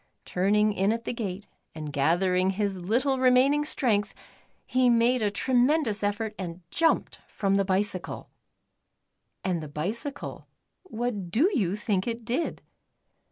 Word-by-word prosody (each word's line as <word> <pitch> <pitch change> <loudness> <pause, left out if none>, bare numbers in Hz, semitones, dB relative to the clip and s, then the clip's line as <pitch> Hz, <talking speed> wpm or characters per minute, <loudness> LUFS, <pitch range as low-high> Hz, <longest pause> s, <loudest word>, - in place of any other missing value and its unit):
Turning 210 +3 +2
in 195 +1 +1
at 230 +1 -3
the - - -2
gate, 205 -4 -4 0.3
and 155 -2 -6
gather 170 +7 +2
ing 185 +1 +2
his 200 0 -1
little 255 +9 0
remaining 260 +3 +4
strength, 220 -9 +1 0.5
he 255 -1 +3
made 240 +1 +3
a 210 - +2
tre 230 +6 -2
mendous 250 -3 +3
effort 210 +1 -1
and 175 -1 -6
jumped 330 -1 +1
from 195 -2 -1
the 195 0 +3
bicycle. 190 -1 -2 1.1
And 180 -3 -1
the 155 - -6
bicycle, 220 - -4 0.3
what 235 - -4
do 285 - +3
you 200 - +1
think 210 -2 -1
it 230 -1 -4
did 255 +8 -2
210 Hz, 145 wpm, -27 LUFS, 190-250 Hz, 1.1 s, remaining